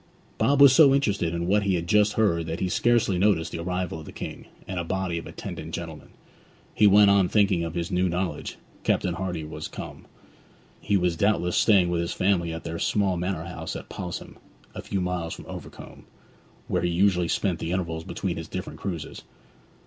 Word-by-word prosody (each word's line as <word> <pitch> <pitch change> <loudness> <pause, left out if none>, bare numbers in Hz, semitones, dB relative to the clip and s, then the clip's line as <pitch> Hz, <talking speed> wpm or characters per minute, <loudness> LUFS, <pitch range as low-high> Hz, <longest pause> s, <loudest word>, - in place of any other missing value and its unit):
Bob 135 +6 +3
was 140 -2 +9
so 140 -2 +7
interested 100 -11 0
in 85 0 -2
what 100 +4 +3
he 100 -2 +1
had 85 -1 -2
just 105 +2 +3
heard 85 -7 +1
that 80 +1 -3
he 95 - 0
scarcely 110 -1 +2
noticed 90 -5 +2
the - - -5
arrival 90 -1 -3
of 80 - -10
the - - -8
King, - - -8 0.2
and 95 -1 -3
a - - -1
body 90 -1 -2
of 80 - -10
attendant - - -6
gentlemen. - - -7 0.7
He 105 - +5
went 100 0 +7
on 100 -3 +4
thinking 100 -5 +3
of 85 0 -5
his 85 +2 -3
new 90 0 +1
knowledge; 85 -3 -3 0.2
Captain 90 - +1
Hardy 90 -3 -3
was 75 - -6
come. - - -9 0.7
He 100 - +1
was 90 -2 +1
doubtless 90 -1 +1
staying 95 -5 +4
with 85 -1 0
his 85 - -2
family 90 -3 +1
at 80 0 -6
their 85 0 -5
small 100 -3 +1
manor 90 -2 -3
house - - -6
at - - -8
Pos'ham, 90 -3 -6 0.4
a - - -6
few 95 - -3
miles 90 -2 -2
from - - -11
Overcombe, - - -10 0.6
where - - 0
he 90 - 0
usually 90 0 +2
spent 90 -1 0
the 80 - -3
intervals 85 -3 -2
between - - -3
his - - -6
different - - -6
cruises. 85 -5 -5
90 Hz, 200 wpm, -26 LUFS, 85-100 Hz, 0.7 s, was